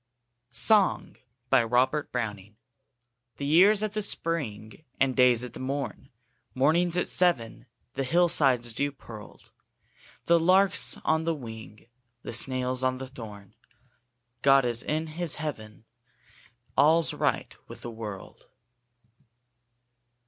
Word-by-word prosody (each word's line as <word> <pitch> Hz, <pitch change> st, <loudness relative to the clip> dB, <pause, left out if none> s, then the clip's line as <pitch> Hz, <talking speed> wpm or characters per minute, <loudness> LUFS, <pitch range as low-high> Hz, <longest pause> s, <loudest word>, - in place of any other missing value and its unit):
35] 120 Hz, -, +2 dB, 0.8 s
RAINBOW 120 Hz, -4 st, +3 dB
GOLD 130 Hz, +5 st, +1 dB
SONG 105 Hz, -4 st, -5 dB, 0.8 s
THE 140 Hz, -, -5 dB
year's 195 Hz, +8 st, +4 dB
at 215 Hz, -1 st, -3 dB
the 215 Hz, -, -2 dB
spring, 150 Hz, -, -4 dB, 0.2 s
And 135 Hz, -2 st, +1 dB
day's 125 Hz, -2 st, +4 dB
at 125 Hz, -2 st, -8 dB
the -, -, -10 dB
morn; 135 Hz, +2 st, -5 dB, 0.5 s
Morning's 165 Hz, +6 st, +2 dB
at 180 Hz, -, 0 dB
seven; 150 Hz, -12 st, 0 dB, 0.3 s
The 135 Hz, -, -2 dB
hill 175 Hz, +7 st, +2 dB
side's 125 Hz, -8 st, +2 dB
dew 145 Hz, +5 st, -2 dB
pearled; 110 Hz, -6 st, -13 dB, 0.7 s
The 170 Hz, 0 st, +4 dB
lark's 185 Hz, +4 st, +3 dB
on 160 Hz, 0 st, +1 dB
the 165 Hz, -1 st, 0 dB
wing; 110 Hz, -, -11 dB, 0.4 s
The -, -, -7 dB
snail's 130 Hz, +1 st, +1 dB
on 130 Hz, 0 st, 0 dB
the 130 Hz, 0 st, -7 dB
thorn; 105 Hz, -6 st, -11 dB, 0.9 s
God's 135 Hz, -4 st, +3 dB
in 155 Hz, +1 st, -2 dB
His 160 Hz, +1 st, -2 dB
Heaven 110 Hz, -8 st, -7 dB, 0.9 s
All's 160 Hz, +2 st, +3 dB
right -, -, -2 dB
with -, -, -11 dB
the 120 Hz, -, -7 dB
world! 105 Hz, -4 st, -9 dB
130 Hz, 120 wpm, -27 LUFS, 115-160 Hz, 0.9 s, year's